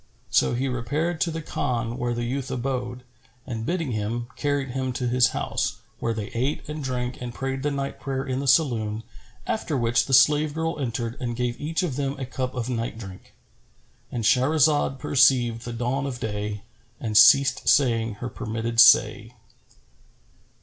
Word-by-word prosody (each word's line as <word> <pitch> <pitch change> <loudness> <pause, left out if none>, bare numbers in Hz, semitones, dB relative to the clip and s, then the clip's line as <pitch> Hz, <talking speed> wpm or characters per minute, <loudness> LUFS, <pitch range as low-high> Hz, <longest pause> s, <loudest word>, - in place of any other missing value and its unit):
So - - +3
he 130 +3 -1
repaired 145 +7 -2
to 170 - +2
the 160 -1 -5
Khan 120 -4 -2
where 120 -2 -2
the 120 - -2
youth 130 +3 -3
abode, 125 -1 -3 0.4
and 115 -3 -5
bidding 165 -6 -1
him, 115 +2 -3
carried 145 -2 -1
him 130 0 -2
to 125 0 -2
his 125 +1 +4
house, - - -2 0.2
where 115 - -1
they 110 -2 -4
ate 130 +5 -2
and 150 0 -5
drank 125 -1 -3
and 125 -1 -4
prayed 135 +2 -4
the 145 - 0
night 140 -1 -4
prayer 135 -1 -3
in 130 -1 -2
the 140 - -3
saloon, 115 -8 +2 0.4
after 160 -9 -2
which 115 -1 +1
the 135 - -2
slave 150 +2 +4
girl 160 -1 -2
entered 120 -2 -3
and 120 -2 -2
gave 125 0 -2
each 160 +3 -1
of 145 -7 -2
them 140 0 -2
a 135 - -4
cup 130 0 -4
of 120 -2 -3
night 115 -2 -3
drink,—And 105 +3 -11
Shahrazad 140 +3 +3
perceived 120 -4 +3
the 120 - -5
dawn 125 +4 -1
of 125 -3 -5
day 105 -1 -4 0.4
and 110 -2 -4
ceased 125 +4 +6
saying 115 -5 +3
her 120 +4 -5
permitted 115 -1 -3
say. 115 -1 +5
125 Hz, 170 wpm, -25 LUFS, 115-135 Hz, 0.4 s, ceased